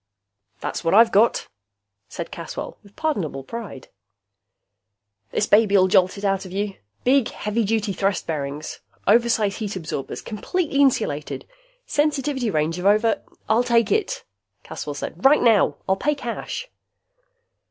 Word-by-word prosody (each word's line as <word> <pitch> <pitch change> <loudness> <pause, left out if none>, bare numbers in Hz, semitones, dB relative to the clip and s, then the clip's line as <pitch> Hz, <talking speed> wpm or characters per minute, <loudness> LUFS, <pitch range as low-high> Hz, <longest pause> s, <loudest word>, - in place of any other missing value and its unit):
"That's - - -4
what 165 +3 +2
I've 230 +1 +7
got," 220 +4 +3 0.6
said - - -6
Caswell, - - -7
with 200 0 -20
pardonable 200 - -2
pride. 210 - -8 1.4
"This - - 0
baby'll 205 -3 +5
jolt 185 +1 +3
it 200 - -5
out 195 -1 +1
of 185 - -10
you. 200 +1 -2 0.3
Big, 265 -1 +3
heavy 210 +2 -2
duty 215 -1 0
thrust 195 0 0
bearings! 150 -1 -4 0.3
Oversize 230 -4 +3
heat 210 -2 -4
absorbers! 160 -6 -5
Completely 280 - -2
insulated! 215 - +1 0.4
Sensitivity 290 -4 0
range 160 0 0
of 185 - 0
over 215 +2 +3
" - - -40
"I'll 220 +2 +4
take 235 -3 +2
it," 430 -3 0 0.4
Caswell 145 - -6
said. 165 +5 -6
"Right 285 +3 +6
now. 225 -4 +4
I'll 190 0 +2
pay 300 +8 +1
cash." 275 - -5
210 Hz, 140 wpm, -23 LUFS, 185-235 Hz, 1.4 s, I've